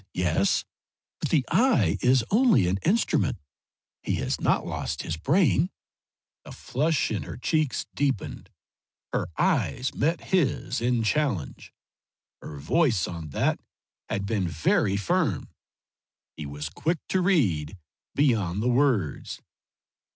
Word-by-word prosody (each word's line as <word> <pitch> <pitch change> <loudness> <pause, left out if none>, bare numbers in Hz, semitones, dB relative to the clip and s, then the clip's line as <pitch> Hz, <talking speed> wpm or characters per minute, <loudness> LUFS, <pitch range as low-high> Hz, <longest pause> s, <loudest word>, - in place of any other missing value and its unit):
"Eyes 95 - -32
yes. 90 +2 +1 0.5
But - - -2
the 140 -6 +2
eye 260 0 +3
is 125 -2 +3
only 225 - +4
an 95 +2 0
instrument; 215 +7 +1 0.6
he - - -1
has - - -2
not - - +2
lost - - -4
his 80 - -3
brain." 160 - +2 0.7
The - - -11
flush 145 +2 -1
in 105 - -1
her - - -7
cheeks 155 +2 0
deepened. 135 -6 -2 0.6
Her - - -1
eyes 130 +1 +1
met 165 +4 0
his 170 -11 +1
in 120 -1 +1
challenge. 110 - -1 0.7
Her 75 - -8
voice 110 - +1
on 85 -3 -6
that - - 0 0.5
had 100 - -2
been 100 -3 -1
very 85 +4 +1
firm. 100 -3 0 0.9
He 75 -2 -6
was 75 +1 -5
quick 160 - -1
to 190 - +1
read 100 - +1 0.4
beyond 110 - +1
the 125 - +2
words. 120 - 0
120 Hz, 130 wpm, -26 LUFS, -, 0.9 s, only